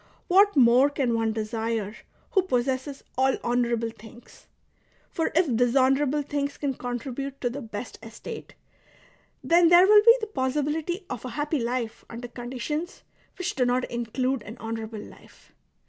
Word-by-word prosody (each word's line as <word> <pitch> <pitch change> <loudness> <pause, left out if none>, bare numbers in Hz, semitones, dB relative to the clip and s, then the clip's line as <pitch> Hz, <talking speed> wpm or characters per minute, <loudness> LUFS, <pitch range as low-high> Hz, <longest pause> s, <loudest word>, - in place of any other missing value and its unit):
What 400 +3 +5
more 255 +1 +6
can 270 -4 -1
one 225 -1 +1
desire 220 -1 -3 0.4
who 385 - +4
possesses 265 -3 -2 0.2
all 265 0 +3
honourable 235 -1 0
things 225 +2 -16 0.6
.^* - - -42
For 325 - 0
if 315 -8 +3
dishonourable 265 +4 +2
things 285 0 -3
can 280 -2 -1
contribute 260 +3 -5
to 245 - 0
the 285 +4 -6
best 220 -1 -7
estate, 225 0 -9 0.9
then 340 0 +5
there 350 +1 +8
will 420 +1 +7
be 465 +2 +8
the 435 - -3
possibility 300 +2 -2
of 250 -4 -6
a 255 - -5
happy 295 +4 -2
life 235 -1 -3
under 240 +1 -7
conditions 260 +8 -5 0.3
which 365 -1 -2
do 260 - +1
not 250 +1 +1
include 245 +2 -1
an 210 +3 -10
honour 225 -1 -4
able 220 -1 -8
life. - - -17
255 Hz, 155 wpm, -26 LUFS, 235-295 Hz, 0.9 s, there